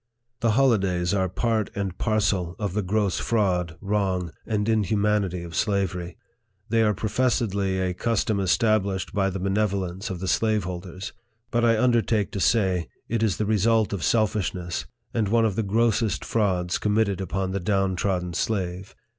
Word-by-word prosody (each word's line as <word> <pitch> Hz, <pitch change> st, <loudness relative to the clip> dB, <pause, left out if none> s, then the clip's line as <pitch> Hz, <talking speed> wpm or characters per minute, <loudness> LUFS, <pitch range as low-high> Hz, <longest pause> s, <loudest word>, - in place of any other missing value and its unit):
The 115 Hz, -2 st, +2 dB
holidays 95 Hz, -9 st, +2 dB
are 95 Hz, -2 st, +1 dB
part 110 Hz, +2 st, 0 dB
and 100 Hz, -2 st, -3 dB
parcel 100 Hz, -6 st, 0 dB
of 100 Hz, -4 st, -3 dB
the 105 Hz, -, 0 dB
gross 100 Hz, 0 st, 0 dB
fraud, 90 Hz, -7 st, 0 dB
wrong, 95 Hz, -4 st, -1 dB, 0.2 s
and 105 Hz, -2 st, 0 dB
inhumanity 105 Hz, -4 st, +1 dB
of 85 Hz, -1 st, -9 dB
slavery. 90 Hz, -2 st, -1 dB, 0.5 s
They 115 Hz, +1 st, +3 dB
are 105 Hz, -2 st, +3 dB
pro 110 Hz, -, -2 dB
fessedly 100 Hz, -5 st, 0 dB
a 90 Hz, -, -2 dB
custom 110 Hz, +1 st, 0 dB
established 100 Hz, 0 st, +1 dB
by 95 Hz, -1 st, +1 dB
the 95 Hz, -, -4 dB
benevolence 95 Hz, 0 st, -1 dB
of 95 Hz, -2 st, -4 dB
the 95 Hz, -, -4 dB
slaveholders; 95 Hz, -4 st, -1 dB, 0.4 s
but 120 Hz, 0 st, +1 dB
I 115 Hz, -1 st, +4 dB
undertake 115 Hz, -3 st, +2 dB
to 100 Hz, -, -4 dB
say, 95 Hz, -5 st, +2 dB, 0.2 s
it 115 Hz, -1 st, 0 dB
is 105 Hz, -6 st, +1 dB
the 105 Hz, -, 0 dB
result 110 Hz, +1 st, +2 dB
of 100 Hz, -, -3 dB
selfishness, 95 Hz, -4 st, 0 dB, 0.3 s
and 110 Hz, -3 st, +1 dB
one 115 Hz, +2 st, +3 dB
of 105 Hz, -4 st, 0 dB
the 115 Hz, -, +1 dB
grossest 110 Hz, +1 st, +1 dB
frauds 95 Hz, -5 st, 0 dB
committed 105 Hz, -2 st, +1 dB
upon 95 Hz, 0 st, -2 dB
the 100 Hz, -, -1 dB
down 95 Hz, 0 st, +1 dB
trodden 90 Hz, -2 st, -1 dB
slave. 95 Hz, -1 st, -2 dB
100 Hz, 160 wpm, -25 LUFS, 95-110 Hz, 0.5 s, I